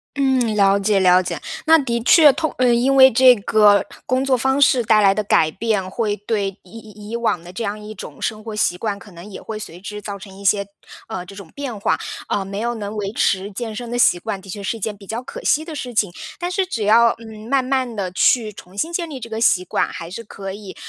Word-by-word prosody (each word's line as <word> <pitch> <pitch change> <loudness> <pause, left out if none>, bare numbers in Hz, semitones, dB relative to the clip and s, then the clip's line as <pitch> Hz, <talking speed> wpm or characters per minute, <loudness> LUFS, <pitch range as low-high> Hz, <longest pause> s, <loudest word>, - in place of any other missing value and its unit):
嗯， 260 -5 +1
了 200 -1 +4
解 200 0 +1
了 185 0 +5
解， - - -5 0.2
那 325 +1 +7
的 235 -4 -1
确， 300 +1 +7
通 315 -2 -2
呃， 250 -1 +4
因 255 +3 +2
为 265 0 +8
这 255 +2 +7
个 205 0 +4 0.2
工 255 +1 0
作 265 -2 +2
方 265 +3 +1
式 255 -3 +4
带 215 -1 +4
来 195 -1 +5
的 210 +2 -1
改 160 -5 +3
变， 205 -1 -2
会 210 0 -1
对 205 -2 -2
以 190 +5 -14
以 210 -1 -12
以 230 - -4
往 225 -7 -1
的 175 - -11
这 225 +5 -5
样 210 0 -3
一 215 0 -9
种 - - -10
生 215 -1 -3
活 220 -2 -6
习 180 -4 +1
惯， 205 -1 -3
可 205 - -15
能 170 +2 -12
也 200 - -9
会 220 -1 -6
随 180 -4 -9
之 210 +1 -7
造 200 -1 -6
成 190 0 -12
一 200 - -11
些， 200 0 +2 0.4
呃， 180 -1 -5
这 195 - -12
种 195 -5 -11
变 260 -7 -5
化， - - +1 0.3
啊， 195 -1 -1
没 200 +1 -5
有 235 +1 -2
能 210 0 -6
维 200 -1 -3
持 195 0 0
健 220 +1 -5
身 240 0 -6
的 240 - -3
习 180 -7 +4
惯， 195 - -4
的 190 -1 -11
确 205 - -6
是 225 +3 -3
一 - - -13
件 210 +1 -3
比 200 -1 -16
较 235 +3 -4
可 - - -9
惜 310 +2 +2
的 325 - -7
事 250 -5 -6
情。 205 -5 +1 0.3
但 355 0 -4
是 385 +1 +1
只 225 - -3
要， 230 +3 +5
嗯， 220 0 -11
慢 270 -2 +2
慢 255 -3 -1
地 190 -3 -3
去 215 +2 +2
重 185 +2 -14
新 330 +9 -2
建 335 -2 -2
立 270 -3 -7
这 230 - -7
个 220 +1 -3
习 185 -5 +3
惯， - - 0
还 165 +1 -8
是 230 +4 -7
可 195 -2 -8
以， 200 -2 -10
215 Hz, 280 characters per minute, -20 LUFS, 200-245 Hz, 0.4 s, 为